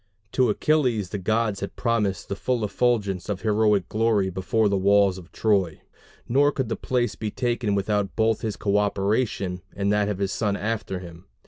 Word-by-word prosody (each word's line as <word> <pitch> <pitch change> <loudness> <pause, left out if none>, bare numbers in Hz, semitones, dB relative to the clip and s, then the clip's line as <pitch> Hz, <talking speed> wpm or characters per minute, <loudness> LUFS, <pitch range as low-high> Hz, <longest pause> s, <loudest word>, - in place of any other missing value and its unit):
To 130 -3 +2
Achilles 120 - +1
the 100 - -4
gods 110 +1 0
had 100 - -6
promised 105 -6 -1
the 100 - -3
full 120 +1 -1
effulgence 105 -5 0
of 100 -2 -2
heroic 105 -3 +2
glory 110 -3 +1
before 100 +4 +1
the 100 - +1
walls 100 -1 +3
of 90 -1 -15
Troy; 100 -7 +1 0.5
nor 140 +4 +3
could 130 -5 -3
the - - -1
place 125 -1 -1
be 110 - -4
taken 120 -2 -1
without 100 0 -1
both 110 -1 +1
his 110 -2 -3
coöperation 100 -1 0
and 100 +1 0
that 105 0 +1
of 105 - -2
his 100 0 -1
son 100 -1 -1
after 110 -3 -3
him. 85 -2 -11
105 Hz, 180 wpm, -24 LUFS, 100-115 Hz, 0.5 s, walls